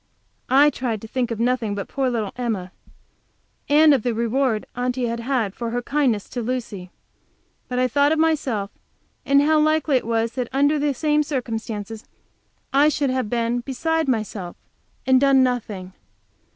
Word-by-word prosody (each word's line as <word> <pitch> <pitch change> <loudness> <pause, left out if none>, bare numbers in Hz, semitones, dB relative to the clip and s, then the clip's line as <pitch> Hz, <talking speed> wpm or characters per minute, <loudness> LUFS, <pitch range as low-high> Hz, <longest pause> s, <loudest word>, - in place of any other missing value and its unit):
I 280 +3 +5
tried 240 -5 -3
to - - -7
think 245 +1 -2
of 230 -2 -4
nothing 235 -3 0
but 200 - -5
poor 270 -2 -1
little 220 -5 -2
Emma, 220 -7 -3 1.0
and 300 +1 +6
of 265 - +2
the 240 0 -1
reward 235 0 0
Aunty 250 0 -1
had 235 0 -3
had 235 -5 -1
for 235 +1 -4
her 245 +1 -3
kindness 255 -7 0
to 245 - -4
Lucy. 220 -6 -4 0.8
But 250 - -4
I 255 0 +3
thought 285 +4 +2
of 320 - +2
myself, 275 -11 0 0.6
and 280 +1 +5
how 310 +1 +3
likely 310 -2 +2
it 245 - -4
was 230 0 0
that 250 -2 -4
under 285 +3 +2
the 290 -1 0
same 300 +2 +2
circumstances 225 -6 -4 0.7
I 285 +2 +5
should 285 -3 0
have 255 -4 -1
been 235 +1 0
beside 315 +5 -1
myself, 215 -7 -3 0.5
and 260 0 +4
done 275 -1 +5
nothing. 210 -7 -3
250 Hz, 165 wpm, -22 LUFS, 225-280 Hz, 1.0 s, and